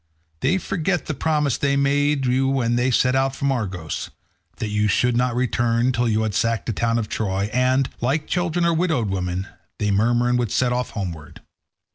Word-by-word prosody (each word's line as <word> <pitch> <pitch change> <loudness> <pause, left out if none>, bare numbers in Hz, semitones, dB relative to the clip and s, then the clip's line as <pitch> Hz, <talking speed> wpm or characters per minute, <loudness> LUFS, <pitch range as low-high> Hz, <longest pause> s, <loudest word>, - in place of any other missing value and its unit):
They 185 - +2
forget 180 -3 -1
the 155 - -3
promise 150 -2 0
they 140 0 +1
made 140 0 +2
you 130 +2 +2
when 125 -3 +1
they 125 +2 +2
set 125 +1 +2
out 135 0 +1
from 140 0 0
Argos, 95 - -3 0.5
that 110 -4 -3
you 105 0 +1
should 125 +3 +2
not 125 0 +1
return 120 0 +1
till 120 -1 0
you 110 0 +1
had 110 -2 -2
sacked 115 0 0
the 115 - -2
town 115 +3 0
of 110 -2 -2
Troy, 100 -1 -2
and, 130 +1 +2
like 140 +6 0
children 175 -1 0
or 170 - +3
widowed 160 - 0
women, 90 0 -2 0.3
they 105 -1 0
murmur 120 +4 +2
and 125 0 +2
would 120 -4 -1
set 125 -1 +1
off 125 0 -2
homeward. 85 -7 -6
125 Hz, 195 wpm, -22 LUFS, 110-140 Hz, 0.5 s, or